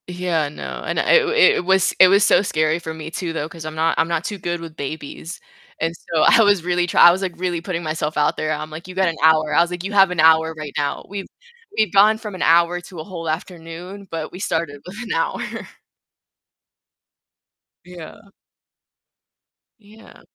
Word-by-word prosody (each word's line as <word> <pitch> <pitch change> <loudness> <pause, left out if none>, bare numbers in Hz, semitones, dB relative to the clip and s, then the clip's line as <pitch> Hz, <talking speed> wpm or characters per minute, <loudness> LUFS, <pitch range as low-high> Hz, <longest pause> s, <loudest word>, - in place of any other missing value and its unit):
Yeah, 175 -4 -2
no, 145 - -8
and - - -3
it 475 -3 +4 0.3
it - - -3
was 190 0 +2
it 185 - +9
was 195 +2 +4
so - - +4
scary 155 -4 0
for 160 -1 -6
me 160 0 -8
too 170 -1 -4
though, 150 -2 -3
'cause 165 -1 -11
I'm 155 0 -6
not 160 +1 +1
I'm 165 - +2
not 170 -1 -2
too 205 - -4
good 175 0 -3
with 165 -2 -10
babies. 155 +3 -7 0.4
And 165 +1 -1
so 165 -1 -3
I 225 - +6
was 205 -4 +3
really 175 0 0
try 175 - +1
I - - +8
was, 190 +3 -2
like, 185 -2 -3
really 175 -1 -2
putting 175 0 -4
myself 155 -1 -3
out 150 0 +1
there. 155 - -2
I'm, 155 0 -4
like, 160 +3 -9
"You 185 - -9
got 190 -1 +2
an 165 - -4
hour." 155 -1 +4
I 170 - +6
was, 170 +1 0
like, 180 0 -5
"You 195 - -4
have 195 -2 +5
an 180 - -4
hour 160 0 +4
right 155 -2 -7
now." 145 -1 -2
We've 200 0 -6 0.5
we've 215 - +1
gone 210 +2 +5
from 210 -3 -8
an - - -8
hour 170 +1 +3
to 175 -1 -11
a - - -5
whole 165 -2 -7
afternoon, 175 +4 -7
but, 160 -1 -5
we 180 - -10
started 160 -6 -3
with 180 +2 -10
an 230 - -10
hour. 165 - -1 2.5
Yeah. 180 +3 -12 1.5
Yeah. 215 +1 -18
170 Hz, 205 wpm, -20 LUFS, 160-185 Hz, 2.5 s, it